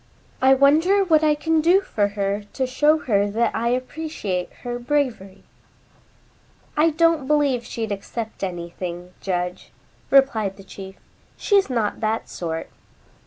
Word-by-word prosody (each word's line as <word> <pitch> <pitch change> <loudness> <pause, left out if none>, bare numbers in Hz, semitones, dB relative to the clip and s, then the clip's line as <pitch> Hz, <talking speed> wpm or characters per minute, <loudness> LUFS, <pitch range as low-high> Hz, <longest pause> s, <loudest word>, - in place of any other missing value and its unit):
I 265 +1 +6
wonder 320 +9 +4
what 315 -4 +3
I 305 -1 +4
can 320 +1 +1
do 355 +5 +4
for 210 - 0
her 200 +1 -1
to 265 - -1
show 295 +5 +3
her 205 -3 +1
that 225 +2 0
I 230 +1 -1
appreciate 255 - -3
her 245 -1 -4
bravery?" 240 -8 -2 1.3
"I 310 +2 +4
don't 325 -3 +2
believe 285 -5 +2
she'd 225 -3 -5
accept 220 +3 -5
anything, 175 0 -5
Judge," 180 -1 -3 0.4
replied 225 -8 +3
the 195 - -12
chief. 190 0 -10 0.4
"She's 400 -5 +2
not 230 -5 -1
that 220 +1 -2
sort." 165 -2 -5
240 Hz, 135 wpm, -22 LUFS, 195-300 Hz, 1.3 s, I